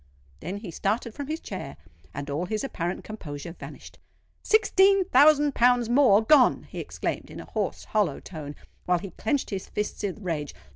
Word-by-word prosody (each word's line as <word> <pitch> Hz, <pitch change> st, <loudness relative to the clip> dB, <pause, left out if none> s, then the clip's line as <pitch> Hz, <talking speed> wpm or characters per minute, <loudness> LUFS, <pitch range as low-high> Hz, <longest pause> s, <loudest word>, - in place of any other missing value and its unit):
Then 180 Hz, +5 st, -5 dB
he 205 Hz, -4 st, -8 dB
started 215 Hz, +6 st, -1 dB
from 285 Hz, +1 st, -6 dB
his 315 Hz, +2 st, -3 dB
chair, -, -, -7 dB, 0.3 s
and 145 Hz, 0 st, -6 dB
all 145 Hz, +5 st, -2 dB
his 215 Hz, +4 st, -2 dB
apparent 175 Hz, -9 st, -3 dB
composure 170 Hz, -7 st, -7 dB
vanished. -, -, -11 dB, 0.4 s
"Sixteen 395 Hz, -2 st, +4 dB
thousand 295 Hz, -1 st, +5 dB
pounds 245 Hz, -1 st, +3 dB
more 240 Hz, -5 st, +5 dB
gone!" 265 Hz, +2 st, +5 dB
he -, -, -9 dB
exclaimed, -, -, -4 dB
in -, -, -9 dB
a -, -, -8 dB
hoarse, -, -, -3 dB
hollow 205 Hz, -9 st, 0 dB
tone, 150 Hz, -4 st, -8 dB, 0.3 s
while 180 Hz, 0 st, +3 dB
he 190 Hz, +2 st, -7 dB
clenched 285 Hz, -, -2 dB
his 195 Hz, -2 st, -5 dB
fists 210 Hz, 0 st, -3 dB
with 200 Hz, -3 st, -3 dB
rage. 160 Hz, -7 st, -4 dB
215 Hz, 175 wpm, -26 LUFS, 175-280 Hz, 0.4 s, thousand